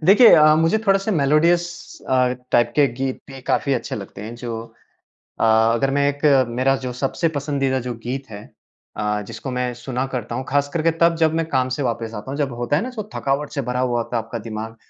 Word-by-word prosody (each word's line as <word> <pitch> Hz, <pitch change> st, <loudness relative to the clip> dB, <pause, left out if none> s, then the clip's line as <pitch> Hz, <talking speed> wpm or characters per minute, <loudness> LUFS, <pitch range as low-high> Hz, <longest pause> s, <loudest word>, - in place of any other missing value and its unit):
देखिए 210 Hz, +6 st, +8 dB
अ, 155 Hz, -1 st, +6 dB
मुझे 165 Hz, +7 st, +2 dB
थोड़ा-सा 195 Hz, +2 st, +2 dB
मेलोडियस 165 Hz, +3 st, +3 dB, 0.4 s
अ, 125 Hz, -1 st, +3 dB, 0.2 s
टाइप 120 Hz, 0 st, +3 dB
के 145 Hz, -1 st, +5 dB
गीत 130 Hz, +1 st, -3 dB
भी 135 Hz, -1 st, -9 dB
काफ़ी 140 Hz, -, +1 dB
अच्छे 120 Hz, -, -3 dB
लगते 100 Hz, -1 st, -9 dB
हैं। 115 Hz, +2 st, -7 dB
जो 120 Hz, -2 st, -5 dB, 0.8 s
अ, -, -, +3 dB
अगर 115 Hz, +4 st, +3 dB
मैं 140 Hz, +1 st, +2 dB
एक 145 Hz, +1 st, -4 dB, 0.2 s
मेरा 130 Hz, +3 st, +1 dB
जो 125 Hz, -, -3 dB
सबसे 165 Hz, +5 st, 0 dB
पसंदीदा 135 Hz, -2 st, 0 dB
जो 125 Hz, 0 st, -4 dB
गीत 135 Hz, +2 st, -4 dB
है, 105 Hz, 0 st, -8 dB, 0.5 s
अ, 105 Hz, 0 st, -1 dB
जिसको 135 Hz, -, -7 dB
मैं 125 Hz, -1 st, -2 dB
सुना 130 Hz, +1 st, -2 dB
करता 115 Hz, -1 st, -4 dB
हूँ, 130 Hz, -, -3 dB
ख़ास 145 Hz, +1 st, +1 dB
करके 165 Hz, 0 st, +2 dB
तब 170 Hz, 0 st, +5 dB
जब 160 Hz, 0 st, +4 dB
मैं 165 Hz, -1 st, 0 dB
काम 130 Hz, -3 st, +1 dB
से -, -, -1 dB
वापस 115 Hz, -2 st, -3 dB
आता 105 Hz, +6 st, -7 dB
हूँ। 140 Hz, -, -5 dB
जब 140 Hz, -4 st, -1 dB
होता 145 Hz, +4 st, +1 dB
है 170 Hz, -, +1 dB
ना 255 Hz, -, -4 dB
तो 215 Hz, -1 st, -5 dB
थकावट 140 Hz, +2 st, -1 dB
से -, -, +1 dB
भरा 125 Hz, 0 st, -1 dB
हुआ 120 Hz, -2 st, +1 dB
होता 120 Hz, -, -5 dB
है 115 Hz, -, 0 dB
आपका 115 Hz, +1 st, -6 dB
दिमाग 110 Hz, +1 st, -6 dB
130 Hz, 220 wpm, -21 LUFS, 120-150 Hz, 0.8 s, देखिए